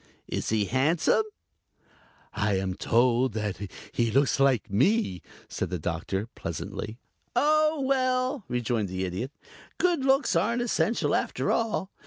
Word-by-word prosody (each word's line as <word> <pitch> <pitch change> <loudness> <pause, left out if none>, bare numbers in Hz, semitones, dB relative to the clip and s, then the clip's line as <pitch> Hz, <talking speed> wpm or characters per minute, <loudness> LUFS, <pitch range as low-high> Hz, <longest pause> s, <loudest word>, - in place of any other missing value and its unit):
Is - - -3
he 110 -2 +2
handsome?" 145 - +2 1.1
"I 100 -1 +1
am 95 -1 -1
told 120 +3 +2 0.5
he 115 -1 +1
looks 135 +4 +2
like 135 -5 +3
me," 130 - +2 0.3
said - - -3
the 90 - -2
Doctor, 85 +5 -2
pleasantly. 100 +6 -5 0.4
"Oh, 310 0 +3
well," 255 -1 +1
rejoined 120 -4 -1
the 95 +1 -2
Idiot, 95 +9 -4 0.5
"good 345 -6 +2
looks 270 -6 +3
aren't 230 +8 +1
essential 235 -1 +1
after - - 0
all. 220 -4 0
130 Hz, 125 wpm, -27 LUFS, -, 1.1 s, like